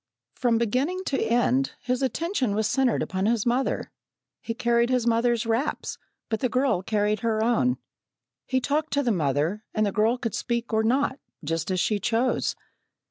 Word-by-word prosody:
From 240 -3 +1
beginning 260 - 0
to 275 - -1
end, 245 +3 +2
his 250 +1 -1
attention 265 - 0
was 220 0 +1
centred 255 +2 +2
upon 190 +1 -1
his 230 -2 +1
mother. 245 +3 0 0.5
He 230 - -4
carried 235 0 +2
his 250 -2 +1
mother's 235 0 +2
wraps, 230 +6 -1 0.3
but 220 -1 -1
the 255 - 0
girl 255 -6 +1
carried 210 +1 0
her 220 -1 0
own. 245 +2 +2 0.7
He 260 - +1
talked 290 +4 -1
to 285 0 +2
the 240 - +2
mother, 160 +4 0
and 215 -1 +2
the 200 - 0
girl 220 +5 +2
could 230 -3 -3
speak 235 -1 -2
or 220 - +3
not, 260 +4 +1 0.2
just 165 +3 -2
as 185 -1 0
she 210 +3 +1
chose. 240 +4 0
235 Hz, 175 wpm, -26 LUFS, 215-255 Hz, 0.7 s, or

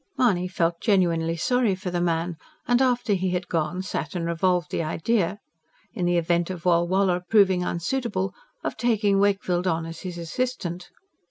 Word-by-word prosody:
Mahony 190 -8 +2
felt 170 -2 -1
genuinely 170 -5 +2
sorry 240 +2 +2
for 185 -1 -5
the 175 -1 -1
man; 170 0 0 0.3
and 245 +1 +3
after 245 -4 +2
he 190 -1 0
had 180 0 -2
gone 170 +2 -1
sat 160 -2 -4
and 170 -2 -2
revolved 175 0 0
the - - -1
idea, 180 +4 0 0.6
in 180 - -2
the 175 0 +2
event 170 +1 +1
of 180 -2 -6
Walwala 180 +1 +2
proving 190 -4 +4
unsuitable, 190 +2 -2 0.3
of - - -2
taking 210 -4 +2
Wakefield 195 -3 +1
on 165 -2 0
as 165 0 -7
his 180 -2 -6
assistant. 175 -1 -3
180 Hz, 165 wpm, -25 LUFS, 170-200 Hz, 0.6 s, proving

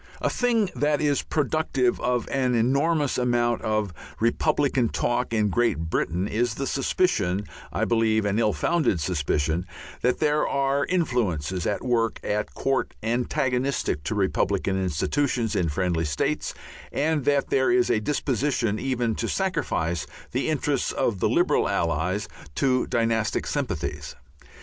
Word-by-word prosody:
A - - 0
thing 230 -6 +1
that 150 0 +1
is 145 -2 +2
productive 145 -4 0
of 125 -1 0
an 130 -3 +1
enormous 140 +5 +2
amount 120 -1 +1
of 110 -4 -1 0.3
republican 130 +1 +2
talk 120 0 -1
in 105 -2 +2
Great 120 +4 +2
Britain 90 +4 0
is 115 +1 0
the 135 - -3
suspicion 105 - 0 0.3
I - - 0
believe 110 -2 +2
an 100 +2 +1
ill 110 -2 +3
founded 155 - +1
suspicion 80 +1 0 0.4
that 125 +1 +2
there 150 0 +2
are 140 +1 +1
influences 95 - 0
at 105 - -2
work 115 -3 +1
at 105 0 -2
court 135 -1 -1
antagonistic 125 - 0
to 110 - -1
republican 95 -1 0
institutions 115 - 0
in 85 -3 +1
friendly 85 0 0
states 75 -2 -1 0.4
and 155 -1 0
that 145 -1 +1
there 130 -1 +3
is 185 0 +3
a 110 - +2
disposition 125 -4 0
even 125 -3 0
to - - -2
sacrifice 85 - -1 0.2
the 130 +5 -1
interests 145 -3 0
of 115 -7 0
the - - +2
liberal - - +2
allies 90 +7 0 0.3
to 130 -2 +2
dynastic 115 -2 0
sympathies. - - -3
120 Hz, 140 wpm, -25 LUFS, 100-140 Hz, 0.4 s, ill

